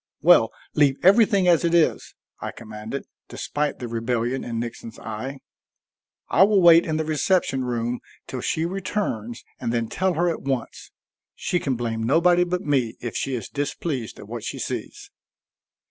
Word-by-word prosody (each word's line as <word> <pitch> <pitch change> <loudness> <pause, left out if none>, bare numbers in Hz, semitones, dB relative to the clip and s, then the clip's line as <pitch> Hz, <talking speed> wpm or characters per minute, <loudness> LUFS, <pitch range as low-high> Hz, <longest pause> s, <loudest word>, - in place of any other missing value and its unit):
"Well, - - +6 0.2
leave 145 -3 +4
everything 200 -1 +5
as 170 -2 +5
it 170 0 +2
is," 165 -2 +1 0.2
I - - -4
commanded, 110 +4 -7 0.2
despite 145 0 -2
the 125 - -5
rebellion 120 +2 -1
in 115 -1 -3
Nixon's 115 -1 -6
eye. 120 +5 -6 0.9
"I - - +2
will 200 +1 +6
wait 170 -1 +7
in 155 -1 0
the 160 - -1
reception 155 -3 +1
room 120 0 -2 0.3
till 130 -2 -5
she 160 +6 0
returns 175 - -3 0.2
and 115 - -2
then 115 -1 -1
tell 185 +4 0
her 175 +3 +2
at 170 - -1
once. 135 -3 -4 0.5
She 175 - -1
can 135 -5 -1
blame 115 -1 -3
nobody 170 +9 +4
but 180 0 -2
me, 130 -6 0
if 120 -2 -5
she 135 - -1
is 115 -5 -5
displeased 145 -3 -3
at 105 - -11
what 115 0 -6
she - - -4
sees." - - -5
135 Hz, 165 wpm, -24 LUFS, 115-170 Hz, 0.9 s, wait